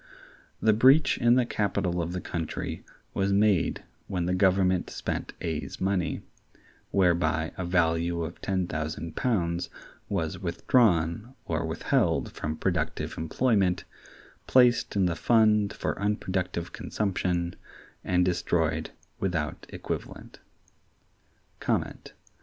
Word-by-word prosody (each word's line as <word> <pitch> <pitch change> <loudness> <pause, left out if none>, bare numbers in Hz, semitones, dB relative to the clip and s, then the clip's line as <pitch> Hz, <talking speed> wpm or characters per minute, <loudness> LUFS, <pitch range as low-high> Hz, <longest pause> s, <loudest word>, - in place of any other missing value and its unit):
The 110 - +4
breach 130 +8 +5
in 120 0 +5
the 125 -1 +3
capital 90 -5 -1
of 85 +1 -3
the 90 0 -3
country 80 -2 -4 0.3
was 100 0 0
made 100 -3 +2 0.2
when 90 -3 -2
the 90 - 0
Government 95 -1 +2
spent - - -4
A's 80 -2 -4
money: 95 -2 -1 0.7
whereby 85 -4 +2
a 95 - -4
value 85 -1 +1
of 80 +2 -7
ten 95 -2 0
thousand 80 0 -4
pounds 90 -8 0 0.4
was 80 -2 -2
withdrawn 90 +2 +1
or 80 0 -1
withheld 80 - +1
from 80 0 -4
productive 80 -3 -1
employment, 95 +2 +1 0.6
placed 125 -4 +4
in 95 -2 +3
the 85 -2 0
fund 105 0 +3
for - - -3
unproductive 90 -4 -2
consumption, 90 -4 -1 0.5
and 90 -1 +2
destroyed 80 -3 0 0.3
without 80 -6 -2
equivalent. - - -6
90 Hz, 110 wpm, -27 LUFS, 85-100 Hz, 0.7 s, breach